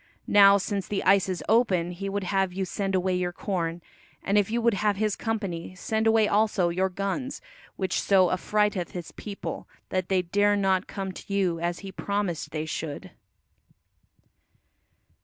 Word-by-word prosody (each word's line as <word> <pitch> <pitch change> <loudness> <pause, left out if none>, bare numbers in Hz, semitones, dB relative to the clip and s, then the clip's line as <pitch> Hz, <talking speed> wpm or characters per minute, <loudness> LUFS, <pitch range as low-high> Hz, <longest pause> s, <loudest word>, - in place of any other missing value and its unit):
Now 200 -1 +7
since 200 0 -3
the 205 - -2
ice 195 0 +4
is 185 - -3
open, 190 -7 +2
he 195 +3 -5
would 200 0 -2
have 195 0 0
you 190 +1 -2
send 195 0 -2
away 185 0 +1
your 180 -1 0
corn, 175 -3 -3 0.4
and 200 - 0
if 205 -1 +3
you 235 +2 0
would 235 -1 +3
have 205 +1 +1
his 215 0 0
company, 195 -6 -4
send 220 +4 -1
away 220 -1 +4
also 205 -4 +2
your 185 +2 0
guns, 200 +9 -3 0.4
which 190 -1 -1
so 190 -3 +4
affrighteth 205 -1 0
his 175 -3 -6
people 200 -2 -7 0.2
that 185 -1 -2
they 185 -2 +2
dare 205 +4 +2
not 195 -1 +1
come 195 -1 -4
to 190 - -11
you 185 -4 +1
as 170 +1 -2
he 195 - -6
promised 200 -5 -2
they 155 0 -3
should." 160 +3 -5
195 Hz, 170 wpm, -26 LUFS, 180-205 Hz, 0.4 s, Now